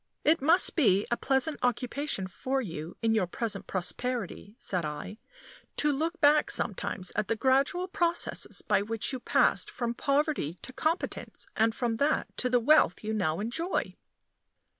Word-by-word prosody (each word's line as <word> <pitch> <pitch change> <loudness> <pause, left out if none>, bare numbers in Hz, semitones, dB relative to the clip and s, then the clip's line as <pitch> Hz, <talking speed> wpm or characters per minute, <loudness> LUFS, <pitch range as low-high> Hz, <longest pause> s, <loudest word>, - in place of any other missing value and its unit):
"It 315 0 +3
must 330 +6 +6
be 205 - +3
a - - +3
pleasant 270 +4 +1
occupation 250 -2 -1
for 260 +9 -3
you 165 -7 -6
in 225 0 +3
your 210 -5 +1
present 210 +2 -4
prosperity," 205 +3 -3
said 180 -3 -2
I, 155 +8 -6 0.6
"to 300 - +3
look 325 +5 -2
back 300 0 +4
sometimes 185 -2 -1
at 210 -1 -1
the 225 - 0
gradual 275 - +1
processes 345 -3 -1
by - - +2
which 225 +5 -1
you 260 - -3
passed - - +2
from 235 -1 -3
poverty 280 - 0
to 255 - -8
competence, 320 +8 -2
and 225 +1 +2
from 235 -3 -1
that 285 +5 0
to 250 - +1
the 245 0 +3
wealth 245 - +3
you 215 +1 -2
now 165 -6 -1
enjoy." 280 - -2
245 Hz, 160 wpm, -29 LUFS, 205-295 Hz, 0.6 s, must